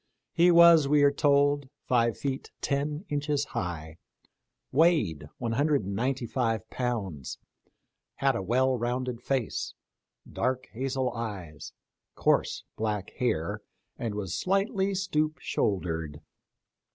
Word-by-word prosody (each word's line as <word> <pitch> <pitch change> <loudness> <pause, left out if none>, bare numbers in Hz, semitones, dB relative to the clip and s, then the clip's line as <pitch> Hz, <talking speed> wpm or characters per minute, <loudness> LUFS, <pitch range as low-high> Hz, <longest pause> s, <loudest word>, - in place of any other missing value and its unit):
He 175 +1 +5
was, 170 -3 +7
we 145 0 +4
are 140 - +6
told, 145 -1 +2 0.2
five 120 -2 +2
feet 135 -1 -3
ten 145 +4 -2
inches 145 -1 -1
high, 80 -6 -5 0.7
weighed 130 - +2
one 120 -2 -2
hundred 145 +1 +2
and 100 +1 -3
ninety^ 125 +2 -1
five 115 -4 -1
pounds, 100 - -3 0.8
had 135 -2 +2
a 95 - -1
well 130 +6 +2
rounded 125 0 -2
face, 130 -5 -2 0.5
dark 130 0 -1
hazel 130 +1 -2
eyes, 100 -10 -6 0.4
coarse - - +1
black 105 -3 -2
hair, 110 -10 0 0.3
and 115 -3 -4
was 95 -5 -3
slightly 195 +1 +1
stoop 155 -5 0
shouldered. 80 -6 -2
130 Hz, 115 wpm, -28 LUFS, 105-145 Hz, 0.8 s, was